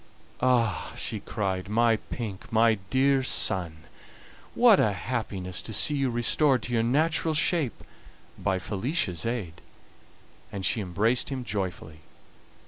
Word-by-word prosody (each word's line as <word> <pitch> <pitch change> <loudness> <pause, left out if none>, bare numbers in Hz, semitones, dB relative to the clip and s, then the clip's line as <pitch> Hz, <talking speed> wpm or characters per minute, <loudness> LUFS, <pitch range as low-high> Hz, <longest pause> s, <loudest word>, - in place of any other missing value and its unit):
"Ah!" 120 -6 +1
she - - -3
cried, 95 -2 -3
"my 115 +1 +3
pink, 105 -4 -7
my 110 -1 +3
dear 135 +1 +3
son, 85 -10 0 0.7
what 235 -5 +6
a 105 - +2
happiness 95 -4 -4
to 110 - -8
see 150 - +3
you 135 -2 0
restored 125 +3 +2
to 120 - -5
your 115 - +2
natural 155 +6 +1
shape 155 -4 +1 0.5
by 95 -2 -1
Felicia's 95 - -2
aid!" 100 -9 -4 0.9
And 95 -2 -4
she 110 - +1
embraced 105 +6 0
him 135 -2 -4
joyfully. 95 -7 -4
115 Hz, 130 wpm, -27 LUFS, 95-130 Hz, 0.9 s, what